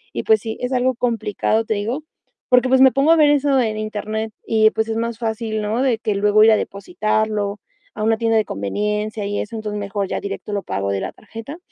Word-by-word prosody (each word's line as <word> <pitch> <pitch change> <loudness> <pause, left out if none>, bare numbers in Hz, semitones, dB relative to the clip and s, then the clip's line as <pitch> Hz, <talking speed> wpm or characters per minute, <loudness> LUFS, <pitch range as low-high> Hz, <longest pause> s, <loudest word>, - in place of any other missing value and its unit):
Y - - -1
pues 220 -1 +4
sí, 220 -1 -5
es 250 +1 -2
algo 255 +1 +2
complicado, 225 -2 0
te 220 - 0
digo, 230 +9 -3 0.5
porque 250 0 +4
pues 260 0 +4
me 265 -1 +8
pongo 275 +4 +3
a - - +7
ver 295 -1 +5
eso 280 -2 +3
en 220 -3 0
Internet 215 +1 -4
y 220 -1 +4
pues 220 0 -1
es 225 0 -2
más 230 -1 -2
fácil, 220 -1 -2
¿no? 220 +4 -1
De 255 -4 +2
que 215 -2 -1
luego 210 +1 +4
ir 220 - +7
a - - +6
depositarlo 215 - -2 0.4
a 215 - -3
una 225 0 +2
tienda 225 -1 +2
de 215 - +2
conveniencia 210 - -2
y 205 0 -2
eso, 220 +2 -5
entonces 210 -1 -4
mejor 200 -1 -3
ya - - -3
directo 200 +1 -5
lo 200 - -1
pago 100 +1 -2
de 100 - -1
la - - -4
tarjeta. 225 +8 -9
220 Hz, 230 wpm, -20 LUFS, 210-235 Hz, 0.5 s, me